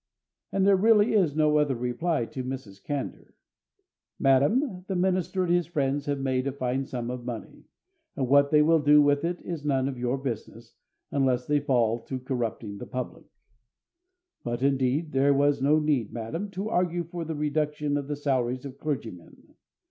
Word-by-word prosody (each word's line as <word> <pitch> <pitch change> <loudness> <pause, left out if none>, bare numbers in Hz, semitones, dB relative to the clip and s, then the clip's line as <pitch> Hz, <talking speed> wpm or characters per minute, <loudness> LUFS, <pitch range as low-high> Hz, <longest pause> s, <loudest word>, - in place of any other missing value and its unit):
And 195 -1 +1
there 200 0 +6
really 210 +2 +4
is 180 -9 +2
no 150 -1 +3
other 145 -3 +1
reply 125 +4 -1
to 130 0 -6
Mrs. 125 -7 -7
Candour: 145 -2 -5 0.8
Madam, 180 - +2
the 190 - -2
minister 185 0 0
and 175 -1 +1
his 175 -1 +1
friends 145 -4 -1
have 145 -1 -1
made 130 -1 0
a - - 0
fine 130 0 -2
sum 120 -2 -4
of 125 -1 -6
money; 120 -2 -7 0.5
and 130 -3 -1
what 140 +2 +5
they 150 0 +5
will 165 +1 +4
do 150 0 +6
with 145 0 +3
it 175 +1 -1
is 165 -4 -5
none 135 -3 +1
of 130 -3 -5
your 125 +2 0
business, 130 -4 -6 0.4
unless 130 -3 +1
they 150 0 +2
fall 120 -4 +1
to 130 +3 -6
corrupting 115 -5 -4
the - - -8
public. 125 -1 -6 1.2
But, 120 +1 -3
indeed, 140 +3 +1
there 140 +1 +3
was 140 0 +2
no 145 +3 +4
need, 150 -8 0
madam, 140 - -4
to 200 +3 -2
argue 175 -3 0
for 170 +1 -6
the 160 0 -4
reduction 150 0 -1
of 140 -1 -2
the 145 - -2
salaries 130 -3 -1
of 135 0 -9
clergymen. 115 - -6
140 Hz, 180 wpm, -27 LUFS, 130-155 Hz, 1.2 s, there